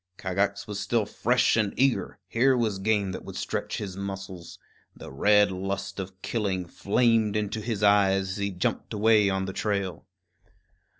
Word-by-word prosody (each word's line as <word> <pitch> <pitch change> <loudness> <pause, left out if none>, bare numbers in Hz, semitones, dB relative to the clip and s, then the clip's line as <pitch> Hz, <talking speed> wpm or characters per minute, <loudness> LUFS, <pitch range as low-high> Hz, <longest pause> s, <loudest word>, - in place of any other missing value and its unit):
Kagax 100 +2 -1
was 105 -2 -5
still 105 +1 0
fresh 125 +4 +2
and 110 -3 0
eager; 125 -8 +1
here 125 +6 +3
was 110 -5 0
game 100 -1 +1
that - - -6
would - - -9
stretch - - -3
his 95 -3 -5
muscles. 95 -3 -7 0.4
The - - -10
red 105 +7 +4
lust 100 +1 -4
of 95 +1 -8
killing 100 -6 -1
flamed 110 +3 +1
into 105 +1 -2
his 105 -2 -3
eyes 95 -2 +4
as 95 - -5
he 100 0 -1
jumped 90 +3 -2
away 105 -1 +4
on 95 0 -1
the 95 - -5
trail. 100 -5 -2
100 Hz, 165 wpm, -27 LUFS, 95-110 Hz, 0.4 s, red